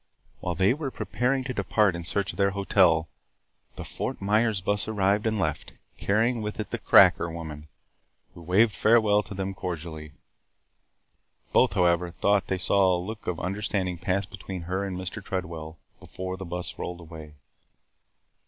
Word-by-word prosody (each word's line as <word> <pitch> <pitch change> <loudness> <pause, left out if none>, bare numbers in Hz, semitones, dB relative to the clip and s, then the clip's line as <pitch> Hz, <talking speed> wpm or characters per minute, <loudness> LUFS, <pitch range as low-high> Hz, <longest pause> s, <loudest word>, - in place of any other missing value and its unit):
While 90 - -3
they 95 +7 +3
were 145 -1 -4
preparing 130 +1 -1
to 130 0 -4
depart 100 -2 +2
in 85 -1 -6
search 100 +3 -1
of - - -13
their 100 -1 +3
hotel, 90 -5 +3 0.7
the - - -6
Fort - - -4
Myers 105 +1 +2
bus 100 +2 -1
arrived 105 0 +1
and 110 0 0
left, 95 - -2 0.3
carrying 115 +4 +1
with 105 0 -5
it 110 - -4
the - - -3
"cracker" 85 - +6
woman, 80 -2 -7 0.7
who 85 - -12
waved 100 +6 +3
farewell 105 0 +4
to 100 - -9
them 95 0 -3
cordially. 80 -5 -6 1.4
Both, - - +4
however, 90 -2 +2
thought 100 +3 +1
they 95 - -1
saw 95 0 +3
a - - 0
look 105 +5 -7
of 85 -3 -2
understanding 95 -1 -2
pass 95 +2 0
between 95 -2 -7
her 95 +3 -2
and 95 -2 -4
Mr. 95 +3 -6
Tredwell 80 -4 -5 0.2
before 95 0 -6
the 95 0 -7
bus 90 +1 -5
rolled 90 0 -5
away. 80 -2 -11
95 Hz, 160 wpm, -26 LUFS, 85-105 Hz, 1.4 s, cracker